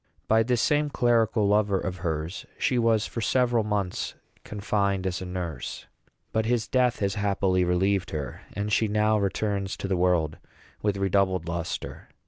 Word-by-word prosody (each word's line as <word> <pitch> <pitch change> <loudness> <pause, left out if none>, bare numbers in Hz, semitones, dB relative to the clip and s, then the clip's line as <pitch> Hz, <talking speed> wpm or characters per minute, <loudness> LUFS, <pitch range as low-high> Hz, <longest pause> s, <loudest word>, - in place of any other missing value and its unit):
By 110 +1 +4
this 120 +1 +1
same 150 0 +2
clerical 115 -5 +2
lover 100 -1 +3
of 95 0 -4
hers 80 0 -3
she 125 - +1
was 115 -2 +3
for 115 - -5
several 120 -1 +2
months 100 -3 -2 0.3
confined 100 -2 -1
as 90 -1 -2
a 95 - -5
nurse. 90 -3 -5 0.5
But 110 0 0
his 120 -2 +1
death 125 -3 +2
has 100 -1 +1
happily 95 -2 +1
relieved 95 +2 +1
her; 75 -3 -5
and 105 +1 -2
she 110 - +3
now 105 +1 +2
returns 100 0 -1
to - - -4
the 95 - +1
world 85 -4 +1 0.4
with 105 -1 0
redoubled 95 -3 +1
lustre. 85 0 -4
100 Hz, 160 wpm, -26 LUFS, 90-110 Hz, 0.5 s, By